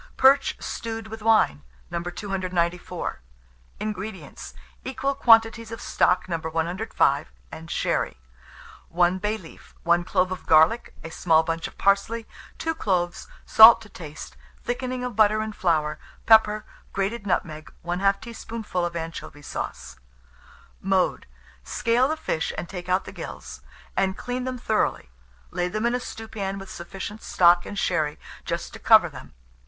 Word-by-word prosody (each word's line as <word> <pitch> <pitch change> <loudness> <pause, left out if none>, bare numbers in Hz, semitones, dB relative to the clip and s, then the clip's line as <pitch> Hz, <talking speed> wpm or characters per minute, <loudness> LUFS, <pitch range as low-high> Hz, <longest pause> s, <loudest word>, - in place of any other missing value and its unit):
PERCH 275 +1 +5
STEWED 225 -1 -5
WITH 220 0 -8
WINE. 215 - +3 0.3
294. 175 - -3 0.6
INGREDIENTS. 210 -1 -6 0.3
Equal 265 +1 -2
quantities 225 -3 +4
of 225 - -6
stock 180 +1 +1
No. 170 -2 -1
105 160 -2 0 0.2
and 165 +1 -9
sherry, - - -1 0.7
1 175 +2 +2
bay 210 +3 -1
leaf, 170 -6 -15
1 170 0 +3
clove 185 +1 +1
of 185 - -6
garlic, 160 +9 +4
a 165 - -7
small 160 -1 +3
bunch 165 0 -2
of - - -15
parsley, 215 +3 +1 0.3
2 325 - -1
cloves, 180 - -1 0.2
salt 225 +1 +9
to 220 - -13
taste; 155 -6 -9 0.3
thickening 250 +1 -3
of 250 -3 -4
butter 215 0 +4
and 215 -1 -4
flour, 155 -4 0 0.3
pepper, 215 -1 +5 0.3
grated 200 +2 -2
nutmeg, 155 -4 -2
1/2 195 +3 +1
teaspoonful 225 -4 -5
of 175 0 -2
anchovy 165 -3 -6
sauce. - - -6 0.8
Mode. 190 -1 +1 0.4
Scale 235 - +1
the 315 +2 -2
fish 160 - -2
and 165 +3 -4
take 180 -1 -7
out 185 +1 +1
the - - -8
gills, - - -8 0.3
and 190 0 +1
clean 250 +1 -4
them 255 -1 -3
thoroughly; 215 - -1 0.4
lay 180 0 -1
them 215 +5 -2
in 240 - +2
a 250 - 0
stewpan 220 -5 -5
with 195 0 -9
sufficient 195 +5 -7
stock 175 0 +4
and 205 - -7
sherry 155 -6 0 0.3
just - - -4
to - - -9
cover - - +6
them. - - -12
195 Hz, 145 wpm, -25 LUFS, 170-225 Hz, 0.8 s, salt